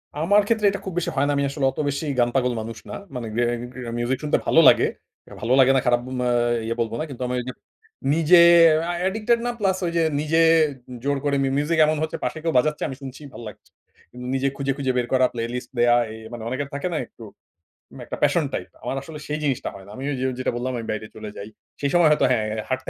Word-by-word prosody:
আমার 195 +7 +3
ক্ষেত্রে 220 -2 +1
এটা 200 -1 -4
খুব 190 - -5
বেশি 175 0 0
হয় 135 +1 +2
না। - - +1
আমি 140 - +1
আসলে 140 -1 -2
অত - - -10
বেশি 140 +3 -3
গান 120 0 +3
পাগল 125 -2 +2
মানুষ 115 0 -7
না। - - -5 0.2
মানে 120 -2 -4
গে - - +2 0.4
গেন 115 -1 -5
মিউজিক 120 +2 0
শুনতে 150 - +2
ভালো - - +5
লাগে। - - +6 0.5
ভালো 120 +4 +1
লাগে 135 0 +6
না 130 - +3
খারাপ 120 0 +3 0.2
মা 125 - 0 0.4
ইয়ে 115 +1 -2
বলব 115 -1 0
না। - - -1
কিন্তু 130 -1 -6
আমি 125 - -3
ওইযে 125 +1 -5 0.6
নিজে 165 +2 +5 0.5
আ - - -1
অ্যাডিক্টেড 220 +5 +1
না 245 - 0
প্লাস 190 -2 +1
ওই 170 - -1
যে 165 - +3 0.2
নিজে 155 +2 +1 0.6
জোর 140 0 0
করে 140 -1 +1
মি - - +1
মিউজিক 155 +3 0
এমন 155 0 +1
হচ্ছে 160 - -3
পাশে - - -3
কেউ 165 - +1
বাজাচ্ছে 150 +4 +1
আমি 135 - -6
শুনছি 135 +2 -9
ভাল - - -9
লাগছে। 105 - -13 0.4
কিন্তু 125 0 -9
নিজে 135 +1 +1
খুঁজে, 140 0 -1
খুঁজে, 135 -2 0
বের 120 -1 0
করা 130 0 +4
প্লেলিস্ট 120 +1 -4
দেওয়া। 120 0 +5 0.2
এ - - -8 0.2
মানে 115 -2 -7
অনেকের 135 +2 -3
থাকে 140 +5 -2
না - - -1
একটু। 115 - -15 0.8
একটা - - -6
প্যাশন - - +3
টাইপ। - - -4
আমার - - -3
আসলে 150 +1 -9
সেই 150 +1 -2
জিনিসটা 135 -4 -1
হয় 95 -1 -12
না। 100 - -13
আমি 130 - -7 0.2
যে - - 0
যেটা - - 0
বললাম 125 +2 -2
আমি 115 - -5
বাইরে 110 0 -4
চলে 110 -1 -7
যাই। 105 +2 -7 0.3
সেই 140 - +1
সময় 175 -2 +5
হয়তো 150 - +3
হ্যাঁ 110 -3 +1 0.2
হাঁটতে 130 0 -2
135 Hz, 235 wpm, -23 LUFS, 120-155 Hz, 0.8 s, লাগে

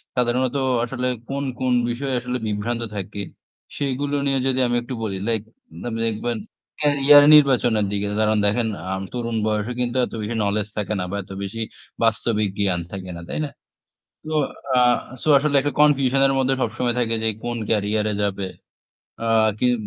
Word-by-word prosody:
সাধারণত 125 +1 +1 0.3
আসলে 125 +1 -2 0.2
কোন, 140 +1 -2 0.2
কোন 130 -1 +1 0.2
বিষয়ে 130 +3 -2
আসলে 125 +1 -3
বিভ্রান্ত 110 +3 -2
থাকে, 100 +1 -5 0.6
সেগুলো 140 +1 -1
নিয়ে 135 -1 +1
যদি 130 0 +1
আমি 120 - 0
একটু 120 +2 -7
বলি 100 -3 -2
লাইক 110 -3 +1 0.4
মানে 115 -2 -3
দেখবেন 115 +2 -2 0.4
ক্যারিয়ার 145 -1 +6
নির্বাচনের 125 -7 +5
দিকে। 100 0 -1
কারণ 110 0 +2
দেখেন 110 +3 +1 0.2
আম 95 - -2
তরুণ 115 -2 -2
বয়সে 105 +1 -1
কিন্তু 125 0 -1
এত - - -12
বেশি 110 +2 -3
knowledge 105 +1 0
থাকে 105 +1 -1
না - - -1
বা 100 - -2
এত 95 - -15
বেশি 105 +4 -5 0.4
বাস্তবিক 110 -2 +1
জ্ঞান 95 -4 +1
থাকে 95 -1 -6
না। 85 - -8
তাই - - -3
না? 145 - -6 0.7
তো 155 0 -5 0.4
আ - - +6 0.4
সো - - 0
আসলে 145 +1 +1
একটা 145 +1 -2
confusion 135 -3 +4
এর 135 - +1
মধ্যে 135 0 +2
সবসময় 120 +1 -1
থাকে 115 -1 +1
যে 110 - +2 0.2
কোন 120 0 -2
ক্যারিয়ারে 105 0 +1
যাবে। 100 -1 -1 0.8
আ 115 - -1 0.3
কিন 125 0 +3
120 Hz, 170 wpm, -22 LUFS, 105-130 Hz, 0.8 s, ক্যারিয়ার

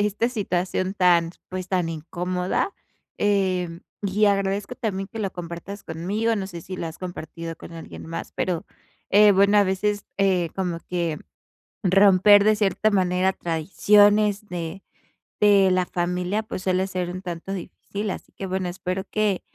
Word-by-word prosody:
esta 210 +3 +1
situación 185 -3 -1
tan, 175 -3 +3 0.2
pues 185 0 -5
tan 180 -3 0
incómoda, 180 - -2 0.5
eh, 185 -4 0 0.2
y 205 +2 +2
agradezco 200 +2 +1
también 195 -5 -3
que 225 - -6
lo 195 -3 -1
compartas 175 +3 -7
conmigo. 200 +8 -1
No 195 -2 -3
sé 170 -3 -8
si 185 0 -7
lo 165 - -4
has 160 - -7
compartido 165 -2 -6
con - - -11
alguien 165 -1 -9
más, 165 - -6
pero, 175 -3 -1 0.5
eh, 205 +1 +7
bueno, 200 +2 +5
a 205 - +5
veces, 205 +2 -1
eh, 185 -4 +2
como 175 -3 -2
que 170 -4 -1 0.6
romper 195 +1 +6
de 215 0 +5
cierta 210 +1 +1
manera 185 -1 +2
tradiciones 205 +5 +3
de 175 +1 -5 0.6
de 200 -2 +5
la 185 -1 +2
familia, 180 +4 -1
pues 190 - -6
suele 185 0 +1
ser 180 -2 -3
un 185 +2 -6
tanto 175 +2 -6
difícil. 200 +2 -5
Así - - -8
que 195 - -6
bueno, 185 -1 -2
espero 185 +1 -3
que 210 -3 0
190 Hz, 155 wpm, -24 LUFS, 175-205 Hz, 0.6 s, eh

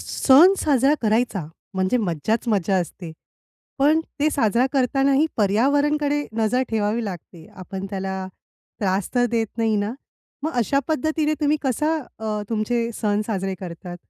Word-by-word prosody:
सण 300 +8 +6
साजरा 275 -1 +3
करायचा, 220 -4 +1 0.3
म्हणजे 185 +5 +1
मज्जाच-मज्जा 200 - 0
असते. 175 -1 -4 0.7
पण 300 +4 +4 0.2
ते 300 - +4
साजरा 235 -2 +2
करतानाही 275 +2 +2
पर्यावरणकडे 285 +7 +2
नजर 235 +4 +2
ठेवावी 220 +1 0
लागते. 175 -3 -8
आपण 190 +1 -6
त्याला 190 -1 -4 0.5
त्रास 190 -1 0
तर 245 -1 +3
देत 230 -1 +1
नाही 225 -1 +2
ना? 205 +2 -1 0.5
मग 315 +2 -2
अशा 275 +5 +1
पद्धतीने 310 0 0
तुम्ही 300 0 +2
कसा 300 +4 0 0.2
अ, 215 -1 -3
तुमचे 230 +1 0
सण 210 -2 +1
साजरे 195 -3 -2
करतात? 175 -1 -7
225 Hz, 130 wpm, -22 LUFS, 195-275 Hz, 0.7 s, सण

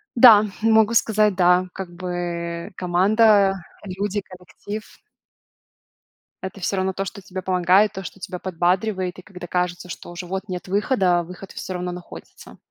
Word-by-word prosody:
Да, 230 -4 +9 0.2
могу 220 0 +4
сказать, 215 -3 +3
да. 180 0 +4
Как 190 -2 -6
бы, 175 -1 -4
команда, 195 +3 +4 0.3
люди, 200 +1 -3
коллектив. 190 +3 -10 1.4
Это 190 +1 -7
всё 195 - -1
равно 190 0 0
то, 195 +1 -3
что 200 +1 -8
тебе 185 0 -7
помогает, 185 +3 +3
то, 190 - -6
что 190 - -9
тебя 185 -2 -6
подбадривает, 185 +1 -1
и - - -9
когда 180 -2 -10
кажется, 180 0 -2
что 175 - -8
уже 175 +1 -7
вот 190 +3 -5
нет 180 0 -5
выхода, 190 -3 +2
выход 180 +3 -10
всё 185 - -6
равно 180 0 -3
находится. 175 0 -11
185 Hz, 150 wpm, -22 LUFS, 180-205 Hz, 1.4 s, Да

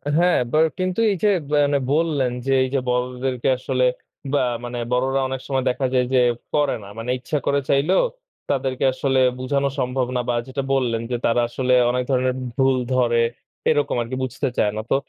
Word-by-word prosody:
হ্যাঁ, 175 +2 +4
আবার 155 +3 +4
কিন্তু 185 +3 -1
এই - - 0
যে 210 - +5 0.2
মানে 145 -1 +3
বললেন 150 -5 +1
যে 135 - 0
এই 130 - -2
যে 135 - +2
বড়দেরকে 125 +1 -1
আসলে 130 0 0 0.5
বা 145 - +3 0.2
মানে 120 0 -5
বড়রা 130 +2 +1
অনেক 130 -1 -4
সময় 135 -2 0
দেখা 130 +1 -1
যায় 125 -1 +3
যে 130 - +5 0.3
করে 145 -2 +2
না। - - -11
মানে 115 +2 -5
ইচ্ছা 130 +5 -2
করে 140 - +2
চাইলেও 145 +7 +3 0.5
তাদেরকে 130 -1 -1
আসলে 135 0 +1 0.2
বুঝানো 140 +2 0
সম্ভব 125 0 0
না 125 - +1
বা 120 - +1
যেটা 135 +1 -3
বললেন 120 -4 0
যে 120 - +1
তারা 120 +1 +3
আসলে 125 +1 0 0.2
অনেক 125 +1 0
ধরনের 130 -1 +2 0.2
ভুল 135 -1 +3 0.2
ধরে। 120 -2 +3 0.5
এরকম 145 -4 +1
আরকি 120 +3 -4
বুঝতে 130 +2 -2
চায় 105 - +2
না। 110 - -2
তো - - +5
130 Hz, 185 wpm, -22 LUFS, 125-140 Hz, 0.5 s, যে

